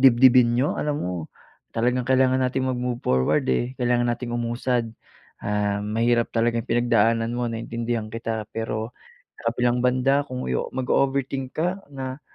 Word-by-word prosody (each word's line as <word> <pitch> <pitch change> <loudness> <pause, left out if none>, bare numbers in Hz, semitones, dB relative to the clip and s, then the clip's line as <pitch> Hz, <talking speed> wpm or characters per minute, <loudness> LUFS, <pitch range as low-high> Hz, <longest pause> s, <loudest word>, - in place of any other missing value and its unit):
dibdibin 125 -2 +6
niyo? 135 +4 +2
Alam 150 -1 -1
mo, 90 - -2 0.6
talagang 125 +2 +1
kailangan 130 0 +4
nating 130 +1 0
mag 130 - 0
move 125 -1 -2
forward 65 0 +2
eh 120 - 0
kailangan 120 -1 +2
nating 120 0 -3
umusad. 120 0 -1 0.5
Um, 105 +1 -1
mahirap 120 0 +2
talagang 115 0 +1
pinagdaanan 115 -1 +2
mo 120 0 -1
naiintindihan 115 -1 -3
kita. 115 -1 -3
Pero, 110 +1 -3 0.4
sa 115 - -1
kabilang 120 0 +1
banda 130 +3 +3
kung 130 0 -4 0.3
mag-o-overthink 135 0 0
ka, 180 +5 -1
na, 130 +1 -5
120 Hz, 140 wpm, -24 LUFS, 115-130 Hz, 0.6 s, dibdibin